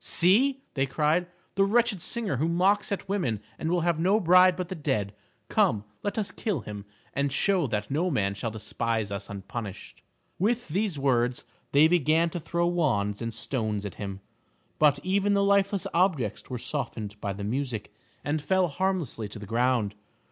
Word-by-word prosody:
"See," 260 +10 +4
they 135 -1 0
cried, 155 +6 +1 0.3
"the 195 - +3
wretched 220 -1 +2
singer 220 - -2
who 155 +6 +1
mocks 195 +5 +2
at 200 - -3
women 175 - -1 0.2
and 160 - -2
will 175 0 +2
have 170 -1 +1
no 190 +6 +3
bride 180 -1 +6
but 180 0 -3
the 190 - -5
dead. 105 - -1 0.3
Come, 105 -1 +2 0.2
let 205 - -3
us 210 -3 0
kill 200 - -2
him, 105 -1 -8 0.3
and 140 0 0
show 180 +2 +2
that 105 0 -3
no 165 +6 +1
man 100 - 0
shall 105 +4 -3
despise 110 0 -2
us 100 0 -4
unpunished." 100 +1 -7 0.4
With 230 +2 0
these 190 0 -1
words 125 -3 +1 0.3
they 145 +3 +6
began 165 0 +3
to 175 - -3
throw 170 +2 -1
wands 120 -13 0
and 115 0 -2
stones 110 -3 -2
at 100 - -5
him, 100 -1 -5 0.6
but 150 -2 +5
even 200 +2 +2
the 200 - +3
lifeless 200 -1 +2
objects 170 - +1
were 125 - -3
softened 110 -6 -4
by 100 - -2
the 100 +1 -6
music, 120 0 -3 0.3
and 150 +1 -1
fell 185 +4 +2
harmlessly 170 - -2
to 105 - -10
the 105 - -8
ground. 115 -1 +1
150 Hz, 175 wpm, -27 LUFS, 110-185 Hz, 0.6 s, bride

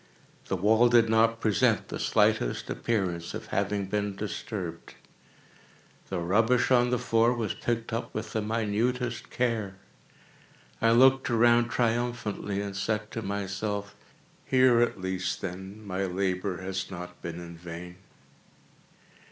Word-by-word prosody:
The - - 0
wall 110 +6 +4
did 115 -2 +5
not 115 +1 +3
present 110 -4 +2
the - - -5
slightest - - +1
appearance 90 -7 -2
of - - -6
having 100 0 0
been 100 0 -2
disturbed. 95 -4 -5 1.1
The 95 - -2
rubbish 110 +9 +2
on 125 -1 +5
the 125 - +1
floor 115 +1 +2
was 110 -4 -2
picked 115 -1 -3
up 115 - -3
with 110 - -5
the 110 - 0
minutest 115 +2 -1
care. 115 -6 -1 1.1
I 115 - +4
looked 130 +2 +5
around 120 0 +4
triumphantly, 115 -4 -1
and 100 -1 -5
said 105 +1 -2
to 115 - -4
myself: 100 0 -3 0.5
"Here 130 -2 +4
at 120 - +1
least, 95 0 -2
then, 95 +4 -7
my 95 0 -2
labor 95 0 -2
has 95 0 -3
not 90 -1 -8
been 85 0 -5
in 85 -1 -9
vain." 85 +1 -9
105 Hz, 135 wpm, -28 LUFS, 95-115 Hz, 1.1 s, did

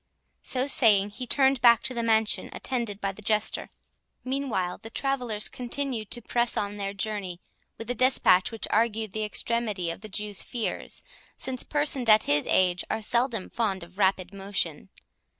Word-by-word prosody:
So 255 0 +1
saying, 210 -7 +4
he 250 +4 -7
turned 265 0 +3
back 235 -1 +6
to 255 - -2
the 235 - -2
mansion, 220 -1 +2
attended 235 -6 -3
by 195 -1 -1
the 200 - -13
Jester. 215 0 +1 0.5
Meanwhile 255 -9 -2
the 225 - -9
travellers 245 -5 -1
continued 250 -3 -3
to 240 - +1
press 240 +1 0
on 205 0 -2
their 195 -1 -3
journey 195 -4 -4 0.4
with 225 - -8
a - - +1
dispatch 250 -8 +4
which 225 - -5
argued 220 -1 +1
the 215 +2 -2
extremity 210 -4 -1
of 165 - -9
the 215 - -9
Jew's 205 0 -3
fears, 235 -3 -4 0.3
since 255 -1 -2
persons 290 -5 0
at 215 0 +7
his 145 0 +2
age 180 -1 +3
are 220 - -2
seldom 235 -2 0
fond 200 -6 -1
of 180 +3 -14
rapid 190 -1 +1
motion. 195 -6 -3
220 Hz, 170 wpm, -27 LUFS, 195-245 Hz, 0.5 s, at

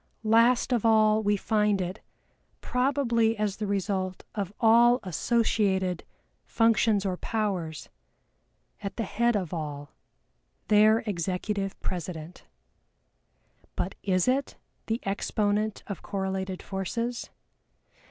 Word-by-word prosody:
Last 230 +3 +4
of 235 - +1
all 220 -1 +4
we 205 -1 +1
find 210 -1 +1
it, 185 +3 -4 0.6
probably 250 -4 +1
as 210 -2 -1
the 210 - -3
result 190 -2 -2
of 200 -3 -3
all 235 +2 +5
associated 190 -2 0 0.4
functions 225 -3 +2
or 185 -2 -1
powers, 185 -9 -3 0.9
at 200 -1 -6
the 230 - -1
head 235 +4 +1
of 185 -5 -2
all, 145 -3 -5 0.8
their 215 +1 +5
Executive 195 +1 -2
president. 170 -1 -6 1.3
But 190 - -2
is 185 0 +1
it 265 +2 0 0.3
"the 225 +1 -1
exponent 205 +1 -1
of 200 - -6
correlated 190 -1 -3
forces?" 230 +5 -3
205 Hz, 105 wpm, -27 LUFS, 190-225 Hz, 1.3 s, all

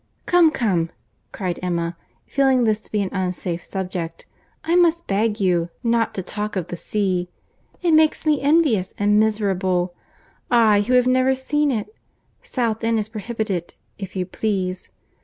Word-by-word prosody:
"Come, 350 -2 +5
come," 190 - 0 0.4
cried 180 -3 -3
Emma, 170 -1 -2 0.3
feeling 265 -3 +2
this 215 -2 +2
to - - -21
be 210 -1 +1
an 190 - -4
unsafe 180 -2 -2
subject, 180 -3 -5 0.4
"I 335 - +1
must 340 -1 +3
beg 210 +2 0
you 175 -3 +1
not 230 -1 +1
to 190 - -3
talk 210 +3 -4
of 180 -3 -3
the - - -4
sea. 185 -1 -1 0.5
It 345 - +3
makes 315 0 +3
me 300 -2 +2
envious 280 - +2
and 205 +1 +3
miserable;—I 205 +2 0
who 235 +5 -1
have 250 -1 +5
never 255 +1 +3
seen 295 +3 0
it! 240 - -2 0.5
South 235 - -2
End 230 0 +2
is 215 0 -2
prohibited, 215 -5 -4 0.2
if 195 -2 -7
you 185 -1 -1
please. 185 -3 -2
210 Hz, 155 wpm, -22 LUFS, 185-255 Hz, 0.5 s, Come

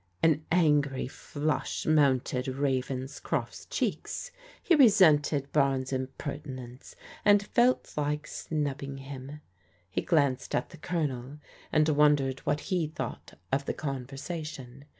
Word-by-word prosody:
An 155 -2 +4
angry 150 -7 +3
flush 150 +3 -3
mounted 135 -4 +2
Ravenscroft's 130 0 -2
cheeks. - - -2 0.3
He 360 - +3
resented 160 - +5
Barnes' 135 -2 +1
impertinence, 130 -1 -6 0.3
and 205 0 +5
felt 245 +4 +2
like 150 0 -1
snubbing 140 -3 -3
hinu 135 +2 -8 0.5
He - - 0
glanced 140 -6 +1
at 120 - -1
the 170 - -11
Colonel, 145 -5 -3 0.3
and 155 0 +4
wondered 145 -3 +3
what 145 0 +1
he 180 -5 0
thought 155 - -6
of 140 +1 +1
the - - -2
conversation. 140 0 -6
145 Hz, 110 wpm, -29 LUFS, 135-155 Hz, 0.5 s, resented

